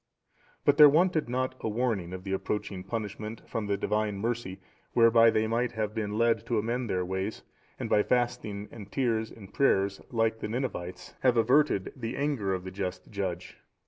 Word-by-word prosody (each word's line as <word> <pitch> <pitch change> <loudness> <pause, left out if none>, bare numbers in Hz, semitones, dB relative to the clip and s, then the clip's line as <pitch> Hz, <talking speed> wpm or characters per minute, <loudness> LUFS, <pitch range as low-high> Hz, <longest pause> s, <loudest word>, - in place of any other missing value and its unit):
But 145 0 +4
there 150 -2 +10
wanted 160 -2 +2
not 130 +1 -1
a - - -2
warning 110 -6 -1
of 95 0 -7
the 95 0 -3
approaching 95 -1 -3
punishment 105 +1 -5
from 110 -2 -3
the 100 0 0
Divine 105 0 -1
mercy 115 -3 -3 0.3
whereby 115 -1 +6
they 110 0 +2
might 115 +2 0
have 110 -2 -2
been 105 -2 -2
led 115 0 +2
to 120 - +1
amend 120 +2 -1
their 90 -1 0
ways, 95 +3 -3 0.4
and - - -3
by 105 - +4
fasting 120 -4 -1
and 105 -4 -10
tears 115 -4 0
and 100 -4 -13
prayers, 100 -7 +2
like 115 -1 +1
the - - -3
Ninevites, 110 -7 -4
have 125 -2 +3
averted 125 -3 +3
the 115 -2 -4
anger 140 -9 0
of 95 -1 -2
the 95 - -7
just 95 -1 -5
Judge. 95 -4 -4
110 Hz, 180 wpm, -29 LUFS, 100-120 Hz, 0.4 s, there